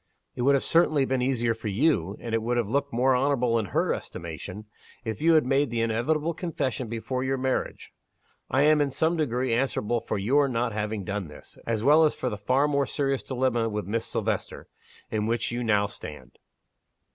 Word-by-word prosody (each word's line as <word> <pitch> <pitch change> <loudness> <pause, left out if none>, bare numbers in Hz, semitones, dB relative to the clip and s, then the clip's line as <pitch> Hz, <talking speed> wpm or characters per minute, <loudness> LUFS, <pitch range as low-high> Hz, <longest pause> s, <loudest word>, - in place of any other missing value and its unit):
It - - -4
would 140 +3 +4
have 135 - +1
been - - -2
certainly 135 -6 +2
easier 120 -3 +1
for 110 -1 -7
you 105 - +1
and 115 -1 -6
it 115 - +2
would 120 +2 -1
have 120 -4 0
looked 140 +5 -1
more 130 +2 +3
honorable 125 -3 +2
in 110 - -2
her 85 - 0
estimation 85 +5 -7 0.4
if 110 -2 -4
you 165 +1 +5
had 155 - +4
made 135 +1 +2
the 115 0 -1
inevitable 145 +9 0
confession 135 -8 -3
before 115 +3 -3
your 135 0 0
marriage. 130 0 -2 0.6
I 135 +3 +3
am, 150 0 +5
in 145 - +1
some 160 +5 +1
degree, 130 -5 0
answerable 120 -2 0
for 110 - -3
your 135 +9 +3
not 120 -2 -1
having 105 -1 -3
done 100 -2 -3
this 75 - -13
as 115 -2 -1
well 150 +4 +6
as 155 - +2
for 125 - -2
the 105 - -4
far 130 +7 +2
more 140 -1 +1
serious 135 -2 -1
dilemma 125 -3 0
with 105 -2 -3
Miss 115 +4 -2
Silvester - - -3 0.4
in 110 -1 -1
which 115 0 -1
you 120 +1 -2
now 105 -3 +3
stand. 100 - -10
125 Hz, 200 wpm, -26 LUFS, 110-140 Hz, 0.6 s, well